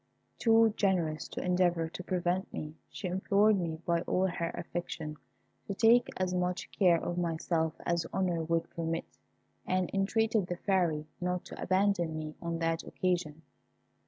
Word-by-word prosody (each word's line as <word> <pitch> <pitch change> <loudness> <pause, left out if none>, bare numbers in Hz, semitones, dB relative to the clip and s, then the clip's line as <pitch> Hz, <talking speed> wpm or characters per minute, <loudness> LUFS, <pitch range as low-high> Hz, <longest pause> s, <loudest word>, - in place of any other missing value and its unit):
Too 225 -1 +5
generous 170 -6 +1
to - - -5
endeavour 180 -2 +2
to 175 +3 -7
prevent 180 +1 -1
me, 150 0 -5 0.2
she 195 - -5
implored 200 +3 +3
me 165 -3 -2
by 170 -1 +2
all 185 +2 +1
her 170 -2 -1
affection, 160 -3 -5 0.5
to 200 - -3
take 235 +3 +5
as 185 -1 0
much 180 0 -1
care 175 -4 +4
of 175 +2 -3
myself 165 -1 0
as 170 -1 0
honour 180 -3 0
would 165 +1 0
permit, 165 0 -2 0.6
and 185 -1 +1
entreated 215 0 +1
the 175 - -3
Fairy 175 -6 +1 0.2
not 180 0 -1
to - - -9
abandon 185 -4 +1
me 155 -1 -5
on 170 -1 -2
that 165 0 0
occasion. 170 -4 -2
175 Hz, 155 wpm, -31 LUFS, 165-190 Hz, 0.6 s, Too